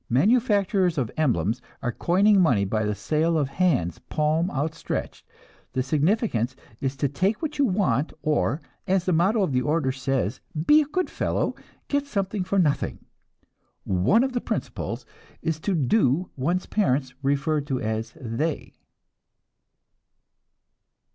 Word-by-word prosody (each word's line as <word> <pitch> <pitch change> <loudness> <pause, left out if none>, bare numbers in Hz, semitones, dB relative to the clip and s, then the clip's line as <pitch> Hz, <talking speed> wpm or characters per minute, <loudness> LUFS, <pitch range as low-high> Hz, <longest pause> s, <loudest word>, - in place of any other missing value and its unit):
Manufacturers 200 - +3
of 125 -5 -1
emblems 120 - +1 0.2
are 120 - 0
coining 195 - +3
money 120 - +3
by 110 +2 0
the 105 0 -1
sale 155 - +1
of 145 -3 +1
hands, 140 - +1
palm 155 +3 0
outstretched. 155 0 -4 0.5
The 130 - 0
significance 145 - +1 0.2
is 135 0 -2
take 155 - 0
what 305 -2 -4
you 280 - +5
want 175 - +1
or, 150 0 +1 0.3
as 185 -1 +2
the 185 - +2
motto 195 +6 +3
of 180 - 0
the 125 -1 +2
order 150 -1 +1
says, 130 -3 -2 0.2
'be 300 +7 +7
a - - -1
good 345 +6 -1
fellow; - - -1 0.3
get 285 0 0
something 200 -5 -1
for 200 +2 -1
nothing.' 155 -7 0 0.8
One 95 - +3
of 265 -1 -1
the 245 - -1
principles - - -4 0.4
is 160 -1 -1
to 190 +4 -1
'do' 150 - +2
one's 170 +8 -1
parents, 130 -10 0
referred 145 +2 0
to 135 -3 -1
as 110 +3 -3
'they.'" 140 +5 -3
155 Hz, 140 wpm, -25 LUFS, 130-195 Hz, 0.8 s, be